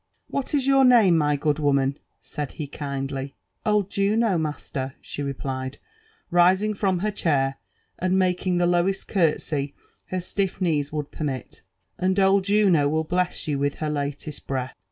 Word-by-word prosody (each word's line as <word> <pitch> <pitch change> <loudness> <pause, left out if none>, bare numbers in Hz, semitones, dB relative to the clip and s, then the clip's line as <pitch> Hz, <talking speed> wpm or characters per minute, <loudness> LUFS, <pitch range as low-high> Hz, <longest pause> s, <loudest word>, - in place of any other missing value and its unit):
" - - -49
What 275 +1 -1
is 275 -3 +1
your 270 0 +5
same, 215 -8 +6
my 150 -2 +2
good 150 +1 0
woman 140 -2 +2
f - - -31 0.2
' - - -51
said 145 -2 -5
he 155 - -5
kindly. 135 -1 -5
'* - - -48
Old 210 -2 +2
Jttno> 200 -2 +2
master," 140 -3 -4
she - - -7
replied, 135 -1 -4 0.5
rising 185 +5 +4
from 195 -2 0
her 215 - +1
chair 135 -8 0 0.4
and 185 +1 +1
making 180 -1 +1
the 175 - +3
lowest 175 +2 +1
cartsey 150 -5 0 0.3
her 185 - -2
stiff 190 +1 -2
kneel 160 -6 +1
would 150 -1 -4
permit; 135 -6 -5 0.4
and 185 +2 +1
old 195 0 +4
Juno 195 -8 +4
will 160 +1 0
Meia 180 0 +3 0.2
you 145 -3 -1
with 145 0 0
her 155 -1 -2
latest 145 +1 -4
breath." 130 -1 -2
160 Hz, 175 wpm, -24 LUFS, 140-190 Hz, 0.5 s, same